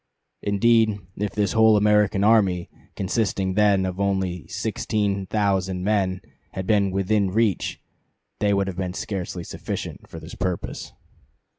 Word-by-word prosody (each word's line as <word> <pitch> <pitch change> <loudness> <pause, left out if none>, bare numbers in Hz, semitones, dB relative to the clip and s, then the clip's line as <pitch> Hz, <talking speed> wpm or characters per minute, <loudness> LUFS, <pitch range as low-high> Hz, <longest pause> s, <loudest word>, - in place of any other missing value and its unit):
Indeed, 110 +1 +3 0.2
if 105 -1 -3
the 105 - +1
whole 110 -1 +5
American 105 -1 +3
army, 100 -5 +3 0.2
consisting 95 -1 -1
then 100 -2 +3
of 95 0 -4
only 95 -4 -1
sixteen 100 -2 -2
thousand 95 -3 0
men, 95 -3 0 0.3
had 95 - -4
been 100 -1 +3
'within 95 +1 +1
reach' 105 -1 0 0.6
they 105 -1 +2
would 100 -1 +2
have 95 -2 -5
been 90 -1 -3
scarcely 95 -4 -4
sufficient - - -6
for - - -8
this - - -11
purpose." 90 -2 -4
100 Hz, 135 wpm, -24 LUFS, 95-105 Hz, 0.6 s, whole